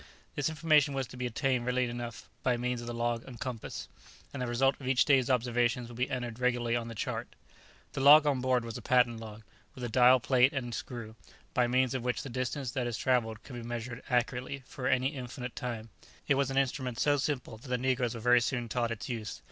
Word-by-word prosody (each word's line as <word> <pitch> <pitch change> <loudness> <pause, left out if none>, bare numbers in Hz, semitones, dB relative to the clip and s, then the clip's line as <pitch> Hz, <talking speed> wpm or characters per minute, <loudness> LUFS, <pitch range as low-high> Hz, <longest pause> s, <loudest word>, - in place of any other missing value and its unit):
This 145 0 0
information 150 -2 +3
was 135 -1 -1
to 125 - -12
be 125 0 -2
obtained 125 +1 0
readily 125 0 +2
enough 120 -2 -6
by 125 -2 +1
means 125 0 -2
of 120 - -8
the - - -3
log 120 0 -1
and 120 -3 -10
compass, 125 -4 -5 0.5
and 140 - -4
the 125 - -1
result 135 +3 +3
of 130 - -6
each 130 -1 +4
day's 135 -3 +4
observations 120 -1 +1
would 120 - -10
be 125 - 0
entered 120 -2 -4
regularly 120 -2 +1
on 115 -1 -2
the 115 - -7
chart. - - -4 0.6
The - - -3
log 150 +2 +9
on 140 -3 +1
board 130 -2 +1
was 115 -1 -6
a - - -11
patent 125 -2 +3
log, 110 -1 -9 0.3
with 125 - -8
a 120 - -2
dial 125 +2 +6
plate 130 +1 +4
and 125 -4 -3
screw, 115 -2 -6 0.4
by 125 -1 +3
means 130 +1 +2
of 130 - -2
which 125 0 -1
the 135 - -6
distance 130 +1 -3
that 125 -1 -1
is 120 -3 -3
travelled 115 -4 0
can 130 - -10
be 120 - -5
measured 120 +1 -5
accurately 125 +2 -1
for 130 0 -5
any 130 +1 +2
definite 125 -3 -6
time; 115 -2 -5 0.4
it - - +5
was 135 -1 +1
an 135 - -2
instrument 130 -3 0
so 145 -1 +3
simple 130 -5 -2
that 120 - -14
the 125 - +1
negroes 125 -2 0
were 115 - -6
very 125 +1 +5
soon 120 -1 -1
taught 120 0 -1
its 115 -2 -5
use. 110 -5 -5
125 Hz, 230 wpm, -31 LUFS, 120-130 Hz, 0.6 s, log